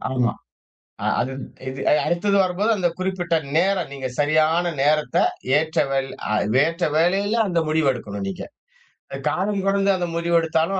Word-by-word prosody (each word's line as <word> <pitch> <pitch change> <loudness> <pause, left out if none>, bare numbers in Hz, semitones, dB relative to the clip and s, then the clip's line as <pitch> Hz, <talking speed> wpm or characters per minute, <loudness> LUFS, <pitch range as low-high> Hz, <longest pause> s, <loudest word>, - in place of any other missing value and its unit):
ஆமா, 125 -2 +1 0.7
அ - - -2
அது 130 - -1 0.4
இது 130 0 -7
அ - - +6
அடுத்தது 200 +4 +1
வரும்போது 185 +4 0
அந்த 180 -4 +1
குறிப்பிட்ட 185 -2 -1 0.2
நேரம் 185 +1 +2
நீங்க 135 -1 -4
சரியான 155 +4 +2
நேரத்த 150 -2 +2 0.4
ஏற்ற 160 +1 -2
வேல் 135 0 -1 0.2
அ - - +2 0.3
ஏற்ற 165 +3 -2
வேலையில 195 +6 +2
அந்த 170 -2 +1
முடிவு 155 -2 +1
எடுக்கணும் 100 -5 -6
நீங்க. 95 - -5 0.7
அ - - -4
காலம் 200 +2 0
கடந்து 195 0 +2
அந்த 180 -1 -2
முடிவு 170 0 0
எடுத்தாலும் 165 +4 0
170 Hz, 155 wpm, -22 LUFS, 150-190 Hz, 0.7 s, அ